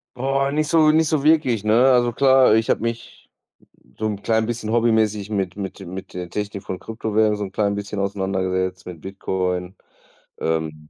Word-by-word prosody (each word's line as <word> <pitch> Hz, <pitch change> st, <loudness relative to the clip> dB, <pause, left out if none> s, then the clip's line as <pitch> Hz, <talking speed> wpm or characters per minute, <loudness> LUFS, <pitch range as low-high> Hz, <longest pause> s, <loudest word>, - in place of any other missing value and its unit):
Boah, 135 Hz, +2 st, 0 dB
nicht 155 Hz, +1 st, 0 dB
so 160 Hz, -1 st, +5 dB
nicht 160 Hz, +1 st, +3 dB
so 150 Hz, -3 st, 0 dB
wirklich, 145 Hz, -9 st, +3 dB
ne? 115 Hz, +5 st, +4 dB
Also 120 Hz, -1 st, +3 dB
klar, 130 Hz, -2 st, +5 dB
ich 110 Hz, 0 st, +1 dB
habe -, -, +2 dB
mich 115 Hz, 0 st, -6 dB, 0.7 s
so 110 Hz, -, -2 dB
'n 105 Hz, -2 st, -4 dB
klein 110 Hz, 0 st, +1 dB
bisschen 115 Hz, -2 st, -3 dB
hobbymäßig 110 Hz, -3 st, +1 dB
mit 95 Hz, -4 st, -2 dB
mit 100 Hz, -1 st, -6 dB
mit 95 Hz, +1 st, -8 dB
der 90 Hz, -1 st, -6 dB
Technik 105 Hz, 0 st, -5 dB
von 90 Hz, -, -5 dB
Kryptowährungen 110 Hz, -1 st, 0 dB
so 105 Hz, -, -3 dB
'n 95 Hz, -, -6 dB
klein 100 Hz, -1 st, 0 dB
bisschen 100 Hz, 0 st, -5 dB
auseinandergesetzt, 95 Hz, -2 st, -2 dB
mit 85 Hz, -4 st, -9 dB
Bitcoin. 95 Hz, -1 st, -3 dB, 0.6 s
Ähm, 80 Hz, -1 st, -3 dB
105 Hz, 175 wpm, -22 LUFS, 95-120 Hz, 0.7 s, so